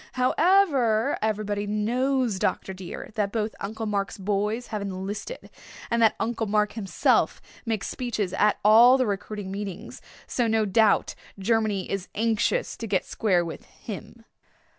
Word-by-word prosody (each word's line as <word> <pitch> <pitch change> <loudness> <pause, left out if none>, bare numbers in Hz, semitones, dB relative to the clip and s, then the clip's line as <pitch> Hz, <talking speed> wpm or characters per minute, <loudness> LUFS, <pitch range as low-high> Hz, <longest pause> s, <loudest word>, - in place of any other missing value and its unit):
However, 270 - +3
everybody 210 -1 -1
knows, 235 +1 0
Dr. 190 - -1
dear, 185 +2 -8
that 205 -2 -1
both 220 -1 -2
Uncle 220 +3 -4
Mark's 200 0 -2
boys 210 +4 -1
have 210 - -2
enlisted, 200 - -6 0.4
and 235 0 +2
that 225 - +5
Uncle 230 -1 -1
Mark 210 0 +1
himself 205 -3 +1 0.3
makes 220 -3 -1
speeches 220 -7 -3
at 210 0 +3
all 235 +5 +8
the 255 - +2
recruiting 205 -1 -4
meetings. 200 -1 -6 0.2
So 240 -2 0
no 220 -1 +2
doubt 210 +1 +3 0.2
Germany 210 -1 0
is 195 -1 -3
anxious 230 - 0
to 230 - -5
get 190 -3 0
square 185 -6 +1
with 165 - -7
him." 225 +1 -10
215 Hz, 140 wpm, -26 LUFS, 200-230 Hz, 0.4 s, all